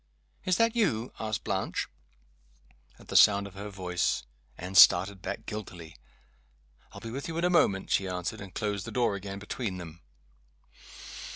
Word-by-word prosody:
"Is 185 -2 +2
that 230 +1 +3
you?" 125 - 0
asked 110 -2 -3
Blanche. - - -2 1.1
At - - -18
the - - -5
sound 100 -1 +6
of 100 - -10
her 100 +2 -7
voice, 90 -3 -1 0.3
Anne 90 +2 -7
started 95 +1 +7
back - - -5
guiltily. 90 -6 -7 1.0
"I'll - - -11
be 115 - -7
with 135 +4 -5
you 165 0 -4
in 170 - -1
a 180 - +2
moment," 100 - +2
she 95 - +2
answered, 90 +3 -4
and 95 -2 -9
closed 100 -1 -3
the - - -6
door 120 -4 +1
again 100 0 -6
between 105 -1 -4
them. 85 -1 -10
100 Hz, 165 wpm, -29 LUFS, 95-115 Hz, 1.1 s, started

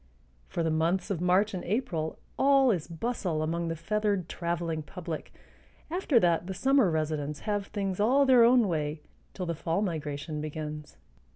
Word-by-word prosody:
For 170 - -2
the 165 - +1
months 170 +4 0
of 175 -4 -2
March 185 +4 +3
and 185 - -4
April 175 -7 -2 0.2
all 275 -2 +5
is 175 -7 -2
bustle 170 -3 -2
among 170 +2 -1
the 165 - -2
feathered 205 +1 -1
traveling 170 -2 -2
public; 165 0 -7 0.6
after 330 -8 +3
that 170 0 +2
the 190 - -4
summer 265 -1 +3
residents 150 -2 -2
have 205 -2 -2
things 195 -3 -3
all 260 +7 +4
their 255 -3 +6
own 240 -2 +5
way 150 -3 -2 0.3
till 185 - -3
the 170 - -1
fall 165 +5 -1
migration 150 -3 -3
begins. 150 0 -6
175 Hz, 165 wpm, -29 LUFS, 155-210 Hz, 0.6 s, their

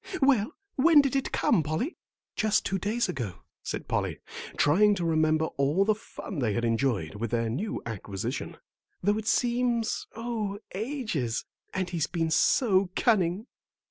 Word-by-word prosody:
"Well, 270 -2 +3 0.2
when 300 +2 +7
did 275 -1 -1
it 270 - 0
come, - - +3
Polly?" 155 - -2 0.4
"Just 215 0 +2
two 195 - 0
days 215 +6 0
ago," 115 -9 -5 0.2
said - - -5
Polly, - - -1 0.4
trying 205 +8 +5
to 175 -3 -2
remember 155 -1 +2
all 145 +8 +3
the 215 - +4
fun 205 -4 -8
they 115 -5 +1
had 120 +3 0
enjoyed 115 -8 0
with 110 +2 -3
their 115 -1 0
new 200 - -3
acquisition, 100 -4 -4 0.5
"though 205 +3 +2
it 215 - -7
seems 240 -2 +1
oh, 220 -3 -3 0.2
ages; 205 - -2 0.3
and 185 -2 -2
he's 165 -4 0
been 165 -3 -1
so 195 - +3
cunning." 195 -2 +2
190 Hz, 150 wpm, -28 LUFS, 140-225 Hz, 0.5 s, when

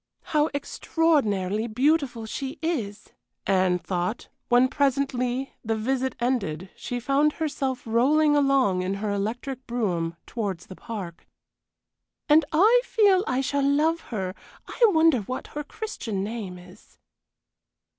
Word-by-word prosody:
"How 300 0 +3
extraordinarily 230 - 0
beautiful 255 0 +1
she 270 +6 -5
is!" 225 -11 -3 0.4
Anne 185 -2 +3
thought, 180 +4 -3 0.2
when 245 +1 +5
presently, 265 -2 0
the 225 -1 -1
visit 260 +4 -1
ended, 195 -9 -1
she 245 - -4
found 280 +5 +2
herself 270 -5 -3
rolling 295 +7 +3
along 275 -10 +3
in 185 +2 -2
her 205 +1 -2
electric 245 +6 -3
brougham 180 -9 -1
towards 200 -7 -4
the 190 - -10
park. 185 -7 -7 1.0
"And 305 +2 +6
I 425 +10 +5
feel 405 -6 +3
I 255 +1 +1
shall 280 +1 0
love 300 +4 +2
her. 190 -5 -3 0.3
I - - -10
wonder 320 - +4
what 255 +5 -5
her 295 - -3
Christian 245 - -5
name 205 -4 -5
is?" 180 0 -17
250 Hz, 125 wpm, -25 LUFS, 200-290 Hz, 1.0 s, And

